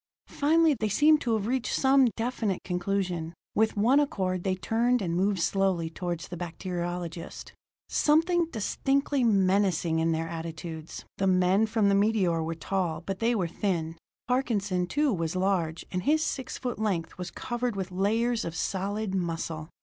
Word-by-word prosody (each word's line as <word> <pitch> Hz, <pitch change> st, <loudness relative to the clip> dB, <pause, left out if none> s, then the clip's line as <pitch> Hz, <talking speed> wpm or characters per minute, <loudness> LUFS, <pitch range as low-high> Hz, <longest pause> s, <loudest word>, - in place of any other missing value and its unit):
Finally 315 Hz, +2 st, +3 dB
they 215 Hz, -, 0 dB
seemed 300 Hz, +7 st, +4 dB
to 230 Hz, -2 st, +1 dB
have 210 Hz, -2 st, -2 dB
reached 250 Hz, +2 st, -1 dB
some 265 Hz, -1 st, +5 dB
definite 225 Hz, -5 st, -2 dB
conclusion; 180 Hz, -2 st, -2 dB, 0.2 s
with 220 Hz, 0 st, +1 dB
one 245 Hz, +7 st, +4 dB
accord 185 Hz, -10 st, -1 dB
they 190 Hz, -1 st, 0 dB
turned 235 Hz, +6 st, +1 dB
and 170 Hz, -5 st, -2 dB
moved 195 Hz, +1 st, +1 dB
slowly 180 Hz, -2 st, +1 dB
toward 175 Hz, -1 st, -4 dB
the 175 Hz, -, -7 dB
bacteriologist, 175 Hz, -1 st, -5 dB, 0.3 s
something 330 Hz, +3 st, +3 dB
distinctly 275 Hz, +2 st, 0 dB
menacing 190 Hz, -6 st, +2 dB
in 165 Hz, 0 st, +2 dB
their 165 Hz, 0 st, -1 dB
attitudes. 165 Hz, -1 st, -7 dB
The 195 Hz, -, +2 dB
men 185 Hz, +3 st, +3 dB
from 215 Hz, -2 st, +2 dB
the 200 Hz, -, +4 dB
meteor 195 Hz, -5 st, +2 dB
were 165 Hz, +1 st, -3 dB
tall, 170 Hz, -1 st, -2 dB
but 190 Hz, +2 st, -5 dB
they 235 Hz, +1 st, +2 dB
were 185 Hz, -5 st, 0 dB
thin; 165 Hz, -2 st, -2 dB, 0.3 s
Parkinson, 205 Hz, -8 st, 0 dB
too, 290 Hz, +5 st, +1 dB
was 165 Hz, -2 st, -2 dB
large, 185 Hz, -4 st, 0 dB
and 180 Hz, -, -1 dB
his 310 Hz, +8 st, +2 dB
six 265 Hz, -5 st, -3 dB
foot 245 Hz, -3 st, -4 dB
length 185 Hz, -6 st, -2 dB
was 180 Hz, -1 st, -4 dB
covered 240 Hz, +1 st, -3 dB
with 190 Hz, -1 st, -4 dB
layers 225 Hz, +5 st, +1 dB
of 165 Hz, -, -5 dB
solid 200 Hz, +2 st, -2 dB
muscle. 165 Hz, -3 st, -3 dB
195 Hz, 160 wpm, -28 LUFS, 175-230 Hz, 0.3 s, some